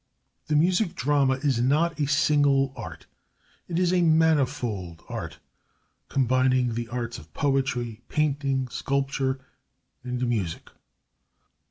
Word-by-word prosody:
The 150 - +1
Music 180 +5 +2
Drama 140 0 +2
is 135 -5 +2
not 155 +6 +2
a 145 - +1
single 140 -2 +3
art. - - -8 0.6
It 170 - -2
is 180 0 +2
a 180 - +3
manifold 140 - +1
art, - - -6 0.7
combining 130 -1 +2
the 120 0 -3
arts 120 0 -4
of 75 +1 -16
poetry, 130 -5 -1
painting, 140 -3 0
sculpture, 135 0 -1 0.6
and 125 0 -2
music. 100 -9 -3
135 Hz, 115 wpm, -26 LUFS, 125-150 Hz, 0.7 s, single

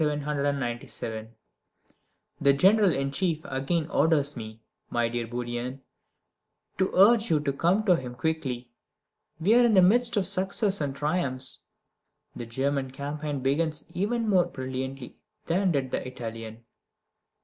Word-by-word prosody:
The 140 -7 -2 1.3
General 200 +4 +5
in 135 -1 -1
Chief 165 +1 0
again 140 +4 -1
orders 150 -3 +2
me, 110 -2 -9 0.3
my 120 -1 +1
dear 120 0 -3
Bourrienne, 120 +2 -4 1.0
to 190 - +2
urge 220 +4 +6
you 155 -2 +3
to 140 -2 -1
come 180 +9 +2
to 185 -4 +5
him 125 -5 -6
quickly. 125 -4 -3 0.7
We 190 +7 +3
are 245 +1 +6
in 230 -3 +4
the 185 - +7
midst 235 +4 +3
of 195 - +2
success 195 0 +2
and 140 -2 -2
triumphs. 140 -4 -2 0.7
The 120 - -6
German 135 +3 -1
campaign 145 +1 -4
begins 150 +3 0
even 225 +5 -1
more 185 -4 +4
brilliantly 130 -3 -6 0.3
than 185 +2 +1
did 135 -4 -1
the - - -3
Italian. 115 -2 -7
145 Hz, 130 wpm, -27 LUFS, 130-180 Hz, 1.3 s, the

